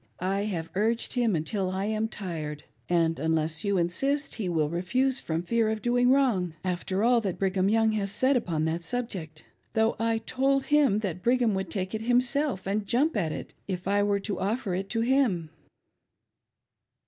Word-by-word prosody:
I 195 Hz, +3 st, -1 dB
have 170 Hz, -6 st, -4 dB
urged 225 Hz, +4 st, 0 dB
him 235 Hz, -6 st, +2 dB
until 185 Hz, +5 st, -1 dB
I 190 Hz, +1 st, -2 dB
am 215 Hz, +1 st, 0 dB
tired, 160 Hz, -8 st, -5 dB, 0.3 s
and 165 Hz, -3 st, +2 dB
unless 160 Hz, 0 st, 0 dB
you 200 Hz, -2 st, +1 dB
insist 275 Hz, +12 st, 0 dB
he 200 Hz, -5 st, -3 dB
will 160 Hz, -3 st, +1 dB
refuse 250 Hz, -, +1 dB
from 165 Hz, +1 st, -3 dB
fear 225 Hz, +3 st, +1 dB
of 220 Hz, -1 st, -3 dB
doing 245 Hz, +1 st, +3 dB
wrong, 230 Hz, -, +2 dB
after 185 Hz, +2 st, -1 dB
all 240 Hz, 0 st, +4 dB
that 195 Hz, -5 st, -3 dB
Brigham 190 Hz, 0 st, +1 dB
Young 225 Hz, 0 st, +3 dB
has 205 Hz, -2 st, -1 dB
said 260 Hz, +6 st, +2 dB
upon 165 Hz, -10 st, 0 dB
that 165 Hz, +2 st, -1 dB
sub 245 Hz, +8 st, -1 dB
ject; 160 Hz, -6 st, -8 dB, 0.3 s
though 220 Hz, 0 st, +2 dB
I 225 Hz, 0 st, +1 dB
told 270 Hz, +4 st, 0 dB
him 285 Hz, -9 st, +3 dB
that 185 Hz, -4 st, -3 dB
Brigham 240 Hz, 0 st, +2 dB
would 190 Hz, -2 st, -2 dB
take 185 Hz, +1 st, -3 dB
it 220 Hz, -, -2 dB
himself 245 Hz, -1 st, +1 dB
and 200 Hz, +1 st, -1 dB
jump 280 Hz, +8 st, +2 dB
at 170 Hz, -7 st, 0 dB
it, -, -, -7 dB
if 185 Hz, -1 st, -4 dB
I 200 Hz, +1 st, +2 dB
were 205 Hz, 0 st, +1 dB
to 205 Hz, 0 st, -3 dB
offer 205 Hz, -1 st, -1 dB
it 190 Hz, +2 st, -3 dB
Jo 225 Hz, -, 0 dB
him." 230 Hz, -, +1 dB
200 Hz, 185 wpm, -27 LUFS, 180-235 Hz, 0.3 s, all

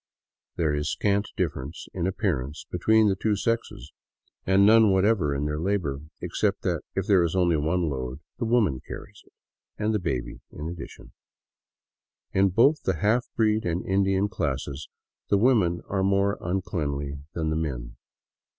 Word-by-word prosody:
There 80 Hz, -3 st, +1 dB
is 75 Hz, +1 st, -1 dB
scant 100 Hz, 0 st, +1 dB
difference 70 Hz, +6 st, -3 dB
in 90 Hz, -1 st, -1 dB
appearance 80 Hz, -, -2 dB
between 110 Hz, +5 st, +4 dB
the 95 Hz, -, +2 dB
two 105 Hz, +2 st, 0 dB
sexes, 100 Hz, -, -2 dB, 0.6 s
and 95 Hz, +1 st, +5 dB
none 110 Hz, 0 st, +7 dB
whatever 95 Hz, -6 st, +2 dB
in 70 Hz, +1 st, -1 dB
their 75 Hz, 0 st, -2 dB
labor, 85 Hz, -6 st, -1 dB, 0.2 s
except -, -, -1 dB
that, -, -, 0 dB
if 95 Hz, -, -1 dB
there 100 Hz, -4 st, +4 dB
is 85 Hz, +1 st, 0 dB
only 90 Hz, -3 st, +3 dB
one 80 Hz, +3 st, 0 dB
load, 65 Hz, -2 st, -4 dB, 0.2 s
the 120 Hz, -, -1 dB
woman 110 Hz, -, +2 dB
carries -, -, -9 dB
it, -, -, -27 dB, 0.5 s
and 110 Hz, +1 st, 0 dB
the 105 Hz, -, +1 dB
baby 80 Hz, -9 st, -3 dB
in 75 Hz, -, -7 dB
addition. 85 Hz, 0 st, -9 dB, 1.2 s
In 95 Hz, 0 st, +3 dB
both 130 Hz, -, +4 dB
the 95 Hz, -, 0 dB
half 110 Hz, +9 st, +1 dB
breed 110 Hz, -1 st, +2 dB
and 85 Hz, -1 st, -2 dB
Indian 95 Hz, +1 st, +2 dB
classes 70 Hz, -4 st, -3 dB, 0.4 s
the 100 Hz, -, +4 dB
women 100 Hz, -7 st, +3 dB
are 95 Hz, -1 st, -1 dB
more 100 Hz, +1 st, +2 dB
uncleanly 75 Hz, -6 st, -2 dB, 0.2 s
than 80 Hz, -2 st, -1 dB
the -, -, 0 dB
men. 65 Hz, -7 st, -4 dB
90 Hz, 160 wpm, -26 LUFS, 75-100 Hz, 1.2 s, none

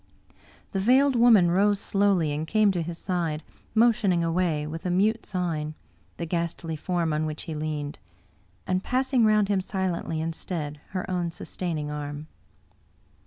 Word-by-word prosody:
The 195 Hz, -, -1 dB
Veiled 260 Hz, +6 st, +4 dB
Woman 225 Hz, -7 st, +6 dB
rose 200 Hz, +2 st, +3 dB
slowly 195 Hz, -7 st, +2 dB
and 150 Hz, +2 st, -3 dB
came 215 Hz, +2 st, +4 dB
to 180 Hz, -3 st, -1 dB
his 165 Hz, +1 st, -5 dB
side, 170 Hz, -5 st, -2 dB, 0.3 s
motioning 220 Hz, -6 st, +3 dB
away, 165 Hz, -3 st, 0 dB
with 160 Hz, +2 st, -6 dB
a 180 Hz, -, -1 dB
mute 210 Hz, +5 st, +1 dB
sign, 160 Hz, -5 st, -2 dB, 0.4 s
the 170 Hz, -, -3 dB
ghastly 170 Hz, -1 st, -2 dB
form 165 Hz, 0 st, -1 dB
on 155 Hz, +1 st, 0 dB
which 155 Hz, 0 st, -5 dB
he 160 Hz, -, -5 dB
leaned, 150 Hz, -1 st, -4 dB, 0.7 s
and 185 Hz, +1 st, 0 dB
passing 255 Hz, -1 st, +2 dB
round 215 Hz, -1 st, +4 dB
him 195 Hz, -2 st, +1 dB
silently, 185 Hz, -4 st, -2 dB
instead, 160 Hz, -2 st, -4 dB, 0.2 s
her 185 Hz, -, -3 dB
own 180 Hz, -2 st, -1 dB
sustaining 160 Hz, -3 st, -4 dB
arm. 145 Hz, 0 st, -5 dB
175 Hz, 150 wpm, -26 LUFS, 155-200 Hz, 0.7 s, Woman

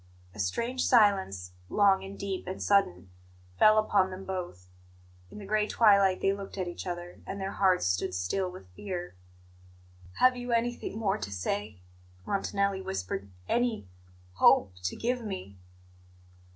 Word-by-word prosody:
A 105 Hz, -, -13 dB
strange 235 Hz, -, -1 dB
silence, 190 Hz, -, +3 dB, 0.2 s
long 195 Hz, -2 st, +4 dB
and 195 Hz, +1 st, -8 dB
deep 195 Hz, -2 st, -4 dB
and 185 Hz, -, -5 dB
sudden, 95 Hz, -, +1 dB, 0.5 s
fell 215 Hz, 0 st, +7 dB
upon 205 Hz, -3 st, +3 dB
them 190 Hz, +1 st, -8 dB
both. 175 Hz, -, -6 dB, 0.6 s
In -, -, -12 dB
the 205 Hz, -, -8 dB
gray 210 Hz, +1 st, +1 dB
twilight 200 Hz, -5 st, +4 dB
they 195 Hz, -, +2 dB
looked 200 Hz, 0 st, -8 dB
at 185 Hz, -2 st, -2 dB
each 175 Hz, +1 st, -6 dB
other, 175 Hz, 0 st, -6 dB
and 195 Hz, -, -5 dB
their 195 Hz, 0 st, -3 dB
hearts 185 Hz, -, +2 dB
stood 90 Hz, 0 st, 0 dB
still 180 Hz, -, -1 dB
with 95 Hz, -, -13 dB
fear. 180 Hz, -, -6 dB, 1.0 s
"Have 255 Hz, -, +4 dB
you 245 Hz, -1 st, -3 dB
anything 235 Hz, -1 st, -1 dB
more 210 Hz, -2 st, 0 dB
to -, -, -5 dB
say?" 100 Hz, +1 st, -3 dB, 0.4 s
Montanelli 200 Hz, 0 st, -1 dB
whispered. 95 Hz, -, -4 dB, 0.2 s
"Any 235 Hz, -, 0 dB, 0.5 s
hope 95 Hz, -, +5 dB
to 90 Hz, -, -1 dB
give 245 Hz, +1 st, -1 dB
me?" 185 Hz, -, -7 dB
190 Hz, 150 wpm, -29 LUFS, -, 1.0 s, fell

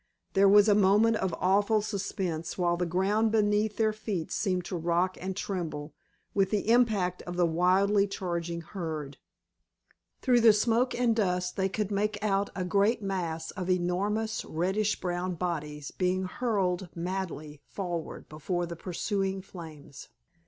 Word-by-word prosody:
There 195 Hz, 0 st, +5 dB
was 205 Hz, +1 st, +7 dB
a 210 Hz, -, +6 dB
moment 210 Hz, +3 st, +4 dB
of 190 Hz, -3 st, -1 dB
awful 205 Hz, +3 st, +3 dB
suspense, 190 Hz, -6 st, -3 dB
while 175 Hz, -1 st, +2 dB
the 175 Hz, 0 st, -1 dB
ground 200 Hz, +5 st, +1 dB
beneath 210 Hz, -1 st, +2 dB
their 220 Hz, -1 st, +2 dB
feet 205 Hz, -6 st, -4 dB
seemed 185 Hz, -4 st, -1 dB
to 185 Hz, -, -4 dB
rock 175 Hz, +2 st, 0 dB
and 190 Hz, +1 st, -4 dB
tremble 160 Hz, -7 st, -4 dB, 0.4 s
with 195 Hz, -1 st, +2 dB
the 210 Hz, +1 st, -1 dB
impact 210 Hz, -7 st, +2 dB
of 175 Hz, -, -4 dB
the 175 Hz, 0 st, +3 dB
wildly 190 Hz, +5 st, +3 dB
charging 170 Hz, -3 st, -3 dB
herd. 155 Hz, -6 st, -5 dB, 1.1 s
Through 245 Hz, -2 st, +4 dB
the 225 Hz, -1 st, +8 dB
smoke 230 Hz, +4 st, +2 dB
and 240 Hz, -2 st, +2 dB
dust 180 Hz, -4 st, 0 dB
they 190 Hz, 0 st, 0 dB
could 210 Hz, +1 st, -2 dB
make 210 Hz, +1 st, 0 dB
out 200 Hz, -1 st, +1 dB
a 185 Hz, -, -2 dB
great 205 Hz, +4 st, +2 dB
mass 175 Hz, -5 st, -3 dB
of 185 Hz, -2 st, -5 dB
enormous 200 Hz, +5 st, 0 dB
reddish 195 Hz, +6 st, -1 dB
brown 180 Hz, 0 st, -2 dB
bodies 150 Hz, -4 st, -4 dB
being 185 Hz, 0 st, 0 dB
hurled 190 Hz, -4 st, -1 dB
madly 170 Hz, -4 st, -4 dB
forward 175 Hz, -4 st, -5 dB
before 175 Hz, +4 st, -3 dB
the 170 Hz, 0 st, -6 dB
pursuing 190 Hz, +2 st, -2 dB
flames. 160 Hz, -7 st, -11 dB
190 Hz, 150 wpm, -29 LUFS, 175-205 Hz, 1.1 s, the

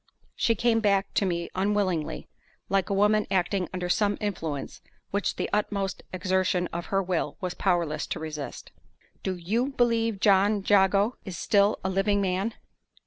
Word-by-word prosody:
She 230 Hz, -, +2 dB
came 230 Hz, +1 st, +2 dB
back 200 Hz, -2 st, +1 dB
to 200 Hz, -, +2 dB
me 170 Hz, -1 st, -2 dB
unwillingly, 190 Hz, -4 st, -1 dB, 0.4 s
like 195 Hz, +1 st, +1 dB
a -, -, 0 dB
woman 210 Hz, +1 st, +3 dB
acting 185 Hz, -1 st, 0 dB
under 180 Hz, -1 st, -3 dB
some 205 Hz, +2 st, +1 dB
influence 160 Hz, -9 st, -4 dB, 0.3 s
which 200 Hz, +1 st, -1 dB
the -, -, -2 dB
utmost 200 Hz, -2 st, -1 dB
exertion 185 Hz, -1 st, +1 dB
of 170 Hz, 0 st, -4 dB
her 195 Hz, 0 st, +1 dB
will 175 Hz, -5 st, -2 dB
was 180 Hz, -2 st, -3 dB
powerless 175 Hz, -6 st, 0 dB
to -, -, -4 dB
resist. 155 Hz, -2 st, -6 dB, 0.5 s
"Do 190 Hz, -, -2 dB
you 210 Hz, +9 st, 0 dB
believe 230 Hz, -5 st, +1 dB
John 200 Hz, 0 st, +3 dB
Jago 200 Hz, +3 st, +4 dB
is 185 Hz, -4 st, -6 dB
still 205 Hz, +2 st, +3 dB
a 190 Hz, -, 0 dB
living 200 Hz, +2 st, +2 dB
man?" 195 Hz, +3 st, -1 dB
195 Hz, 155 wpm, -27 LUFS, 180-205 Hz, 0.5 s, Jago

